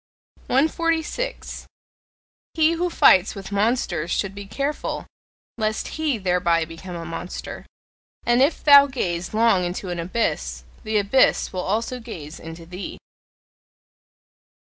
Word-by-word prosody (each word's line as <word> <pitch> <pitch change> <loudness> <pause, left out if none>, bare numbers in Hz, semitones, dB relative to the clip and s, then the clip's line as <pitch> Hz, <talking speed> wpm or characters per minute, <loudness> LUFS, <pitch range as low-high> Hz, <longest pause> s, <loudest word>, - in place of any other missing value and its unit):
146. 325 - -1 0.9
He 315 0 +4
who 345 +2 0
fights 190 - +5
with 195 0 -8
monsters 200 -6 0
should 195 +2 -1
be 200 0 -8
careful 280 +7 -3 0.5
lest 215 0 -1
he 310 -5 -1
thereby 180 -4 +1
become 165 +2 -9
a 170 -1 -6
monster. 170 +2 -7 0.6
And 240 +1 +3
if 285 +5 +2
thou 285 -1 +9
gaze 175 -10 -3
long 220 -4 +3
into 180 +2 -4
an 175 -1 -3
abyss, 65 - -2 0.2
the 215 0 0
abyss 205 +6 +3
will 185 - -2
also 230 +6 -2
gaze 170 -10 -9
into 165 +1 -9
thee. 180 +3 -7
200 Hz, 120 wpm, -23 LUFS, 175-265 Hz, 0.9 s, thou